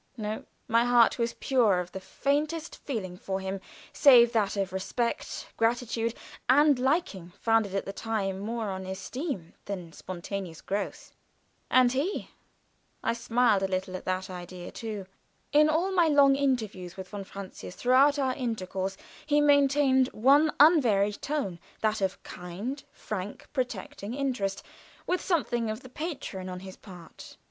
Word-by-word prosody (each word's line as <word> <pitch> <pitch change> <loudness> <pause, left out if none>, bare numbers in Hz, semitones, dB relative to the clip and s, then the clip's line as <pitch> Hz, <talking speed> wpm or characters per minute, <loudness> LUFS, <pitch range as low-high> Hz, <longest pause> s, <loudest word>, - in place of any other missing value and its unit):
No; 215 -1 -4 0.2
my 230 +1 +4
heart 245 -1 +4
was 235 0 0
pure 230 -9 +3
of 180 0 -5
the 190 - -6
faintest 295 - -1
feeling 200 -10 -4
for 190 +1 -3
him, 190 0 -4 0.3
save 240 -5 +7
that 205 -3 +1
of 195 -2 -1
respect, 235 +5 -3
gratitude, 230 0 0 0.3
and 285 0 +5
liking 250 - 0
founded 225 -4 +2
at 195 - -1
that 195 - -6
time 200 -4 -2
more 220 0 -3
on 190 0 -5
esteem 190 - -5
than 180 -5 -6
spontaneous 185 -2 -6
growth. 200 0 -4 0.6
And 255 -1 +5
he 290 +10 -2 0.7
I 230 - +1
smiled 230 -3 +2
at 190 -1 0 0.2
that 185 +1 -2
idea, 180 0 -8
too. 215 -4 -5 0.5
In 300 +1 +5
all 340 +5 +1
my 350 -3 +4
long 285 -2 +6
interviews 220 -11 -1
with 190 -1 -7
von 205 -1 -6
Francius 195 -1 -9
throughout 270 +4 +4
our 265 -2 +1
intercourse 195 -6 -3 0.3
he 295 -1 +4
maintained 280 -2 +4
one 285 +7 +5
unvaried 230 - +5
tone, 270 - -2 0.2
that 215 -1 +1
of 190 -1 0
a - - -19
kind, 195 +11 -6
frank, 200 -1 -6
protecting 255 -3 -3
interest, 245 -9 -2 0.4
with 360 - 0
something 240 - 0
of 220 +3 -4
the 255 - -12
patron 255 - -5
on 180 0 -6
his 190 -1 -9
part. 180 -5 -13
225 Hz, 145 wpm, -28 LUFS, 190-270 Hz, 0.7 s, save